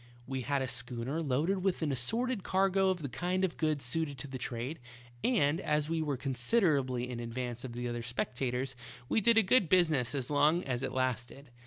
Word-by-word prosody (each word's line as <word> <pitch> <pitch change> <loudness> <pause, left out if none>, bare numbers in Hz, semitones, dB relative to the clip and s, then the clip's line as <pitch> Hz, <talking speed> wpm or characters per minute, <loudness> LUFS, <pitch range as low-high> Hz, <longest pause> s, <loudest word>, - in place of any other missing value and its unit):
We 130 0 -3
had 140 +1 0
a - - -2
schooner 125 +4 -2
loaded 160 +7 +1
with 190 -3 0
an 150 - 0
assorted 225 - 0
cargo 190 +1 +2
of 180 -4 -1
the - - -1
kind 180 +8 -1
of 175 - -4
goods 155 -5 0
suited 145 +1 -1
to 125 - -6
the 130 -1 -6
trade, 125 +6 -4 0.4
and 165 - +2
as 150 0 0
we 165 -1 0
were 145 -4 -1
con 135 +1 -3
siderably 130 - +2
in 125 -1 -5
advance 120 0 -4
of 125 -3 -6
the 120 +1 -3
other 120 0 -3
speculators 125 +2 -2 0.3
we 220 - +2
did 230 +2 +5
a 225 - +7
good 200 -2 +4
business 155 -9 +3
as 135 0 -2
long 150 +5 +3
as 125 -2 -2
it 135 - -2
lasted. 130 +1 -3
140 Hz, 205 wpm, -32 LUFS, 125-170 Hz, 0.4 s, a